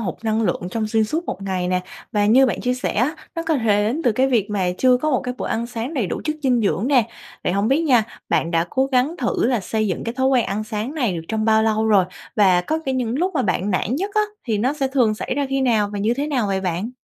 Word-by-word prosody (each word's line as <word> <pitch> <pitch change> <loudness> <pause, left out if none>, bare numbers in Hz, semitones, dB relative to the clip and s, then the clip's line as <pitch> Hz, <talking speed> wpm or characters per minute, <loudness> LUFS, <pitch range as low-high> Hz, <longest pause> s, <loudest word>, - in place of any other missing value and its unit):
hụt 225 - -3
năng 220 +1 +1
lượng 175 -4 -1
trong 220 +2 -2
xuyên 220 0 +2
suốt 320 +10 -2
một 195 - -5
ngày 185 -2 -2
nè. 180 0 +1 0.3
Và 205 -1 +2
như 260 +5 +6
bạn - - -2
chia 250 0 0
sẻ 250 - -2
á, 255 +9 +1 0.2
nó 330 - -2
có 320 -2 +1
thể 210 -3 +2
đến 260 +9 -1
từ 240 - +4
cái 260 +4 +2
việc 230 -6 +1
mà 195 -3 0
chưa 255 -1 +5
có 305 +5 -1
một 260 - +2
cái 250 0 -4
bữa - - -3
ăn 230 +1 -2
sáng 235 +5 -5
đầy 240 -9 0
đủ - - -4
chất 305 0 -1
dinh 250 -3 +2
dưỡng 215 +2 0
nè. 250 -6 +3 0.4
Vậy - - +1
hông 200 +3 +1
biết 280 +5 +2
nha, 250 -8 +4 0.2
bạn 165 - +1
đã 165 0 +1
cố 265 0 +1
gắng 270 +4 +1
thử 240 - 0
là 245 -3 +1
xây 215 +3 -1
dựng 180 - -3
cái 230 +1 -3
thói 260 0 +1
quen 260 -3 +3
ăn 210 +2 -2
sáng 220 +5 -4
này 245 - 0
được 165 - -5
trong 220 -1 -1
bao 220 0 +4
lâu 220 0 +1
rồi? 200 -4 +4 0.3
Và 190 -4 +5
có 315 - -2
cả 265 - 0
những 250 0 -1
lúc 365 +1 0
mà 260 - +1
bạn 185 +1 0
nản 205 +6 0
nhất 390 +5 -2
á 425 - +4 0.2
thì 220 -4 -1
nó 255 +6 +1
sẽ 280 -3 -1
thường 245 -5 +2
xảy 255 - -4
ra 285 -1 0
khi 270 0 0
nào? 225 -6 +2
Và 205 - -3
như 220 +4 +1
thế 285 +3 -2
nào 255 -8 0
vậy 195 -1 -1
bạn? 185 +5 -2
230 Hz, 290 wpm, -21 LUFS, 210-265 Hz, 0.4 s, như